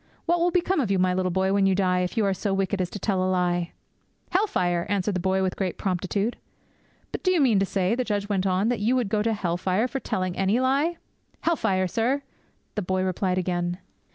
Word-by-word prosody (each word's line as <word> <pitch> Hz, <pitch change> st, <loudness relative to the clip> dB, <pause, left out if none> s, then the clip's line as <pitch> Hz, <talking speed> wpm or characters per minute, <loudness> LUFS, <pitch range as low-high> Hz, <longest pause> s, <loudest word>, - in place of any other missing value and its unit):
What 345 Hz, +1 st, +2 dB
will 345 Hz, +1 st, +3 dB
become 360 Hz, 0 st, +1 dB
of 245 Hz, -8 st, 0 dB
you, 195 Hz, -, +2 dB
my 185 Hz, 0 st, +2 dB
little 185 Hz, 0 st, 0 dB
boy, 190 Hz, +2 st, +1 dB
when 200 Hz, -1 st, +3 dB
you 190 Hz, -, +3 dB
die, 180 Hz, -1 st, +2 dB
if 180 Hz, +5 st, -2 dB
you 220 Hz, -, +3 dB
are 195 Hz, -, +2 dB
so 195 Hz, +1 st, -1 dB
wicked 195 Hz, 0 st, 0 dB
as 180 Hz, -, -1 dB
to -, -, -6 dB
tell 195 Hz, -3 st, 0 dB
a 185 Hz, -, +1 dB
lie?"' 175 Hz, -2 st, 0 dB, 0.6 s
'"Hell 390 Hz, +4 st, +2 dB
fire!" 175 Hz, -, 0 dB
answered 200 Hz, 0 st, 0 dB
the 180 Hz, -, -1 dB
boy 190 Hz, +1 st, +1 dB
with 185 Hz, -1 st, -1 dB
great 185 Hz, -3 st, -2 dB
promptitude. 195 Hz, +4 st, -1 dB, 0.7 s
'"But -, -, -4 dB
do 370 Hz, -, +1 dB
you 360 Hz, -, +3 dB
mean 240 Hz, -8 st, +4 dB
to 195 Hz, -, +1 dB
say," 190 Hz, +1 st, +1 dB
the 255 Hz, +2 st, 0 dB
judge 205 Hz, -3 st, -2 dB
went 195 Hz, -2 st, 0 dB
on, 190 Hz, +4 st, +1 dB
"that 245 Hz, -, 0 dB
you 225 Hz, +5 st, +2 dB
would 245 Hz, -6 st, 0 dB
go 210 Hz, 0 st, +1 dB
to 225 Hz, +2 st, +1 dB
hell 175 Hz, -4 st, -1 dB
fire 190 Hz, +6 st, +1 dB
for 270 Hz, -, -3 dB
telling 185 Hz, -6 st, -2 dB
any 195 Hz, +5 st, +2 dB
lie?" 280 Hz, +6 st, +1 dB, 0.4 s
'"Hell 335 Hz, +1 st, +2 dB
fire, 190 Hz, -8 st, +1 dB
sir!" 245 Hz, +9 st, 0 dB, 0.5 s
the 210 Hz, -, -2 dB
boy 185 Hz, 0 st, -1 dB
replied 185 Hz, 0 st, 0 dB
again. 175 Hz, -1 st, -1 dB
195 Hz, 240 wpm, -25 LUFS, 185-230 Hz, 0.7 s, mean